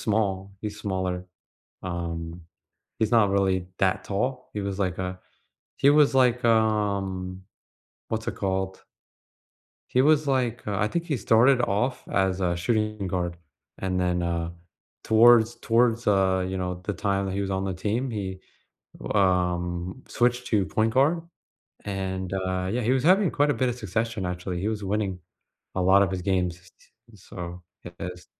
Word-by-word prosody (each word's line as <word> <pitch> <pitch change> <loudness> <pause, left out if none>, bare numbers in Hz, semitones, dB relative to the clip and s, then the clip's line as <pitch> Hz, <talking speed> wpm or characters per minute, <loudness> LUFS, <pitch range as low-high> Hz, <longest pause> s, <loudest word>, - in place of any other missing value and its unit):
small, 100 -3 -1
he's 105 -1 -5
smaller. 95 -2 -2 0.6
Um, 85 -1 -5 0.6
he's 110 -2 +1
not 110 -4 +5
really 95 -2 +1
that 95 0 +1
tall. 125 +6 -2
He 105 - -3
was 100 0 -4
like 95 -2 -1
a 90 0 -4 0.6
he 140 - +5
was 145 -2 +4
like, 125 -2 +3
um, 100 -5 +1 0.7
what's 115 0 -3
it - - -2
called 95 -1 -2 1.1
he 130 - +3
was, 150 +1 +4
like, 125 -3 0
uh 100 - -1
I 105 - +2
think 170 +8 -2
he 145 -6 -1
started 120 +5 +4
off 120 +4 -1
as 95 -1 0
a 90 -1 +1
shooting 105 +2 -1
guard, 90 -2 -2 0.4
and 95 -1 -1
then, 90 -1 0
uh, 85 -1 -1 0.5
towards 115 +1 +6
towards, 115 0 +2
uh, 95 -2 +3
you 95 0 -3
know, 90 -1 -2
the 105 - -1
time 100 0 -1
that 95 - -3
he 100 - -1
was 100 -1 -2
on 95 0 -1
the 95 - -2
team, 110 +8 -1
he, 95 -4 -4 0.8
um, 90 +1 0
switched 125 +1 +1
to 105 -4 +2
point 110 +1 0
guard, 150 +6 +3 0.6
and, 95 -2 -3
uh, 95 -1 -1
yeah, 125 +2 0
he 115 +3 +2
was 130 -1 +2
having 185 +1 +5
quite 145 +1 +2
a - - +1
bit 130 - +1
of 120 - -2
succession, 110 -2 -2
actually. 90 0 -4
He 100 - -1
was 105 -2 -3
winning 95 -2 -1 0.5
a 95 - 0
lot 95 +2 +6
of 95 - +1
his 95 -1 -3
games. 90 -2 0 0.2
T - - -23 0.2
and 110 -3 -17
so, 90 -1 -8 0.2
yeah, 90 - -8
his 90 -1 -7
100 Hz, 170 wpm, -26 LUFS, 95-115 Hz, 1.1 s, towards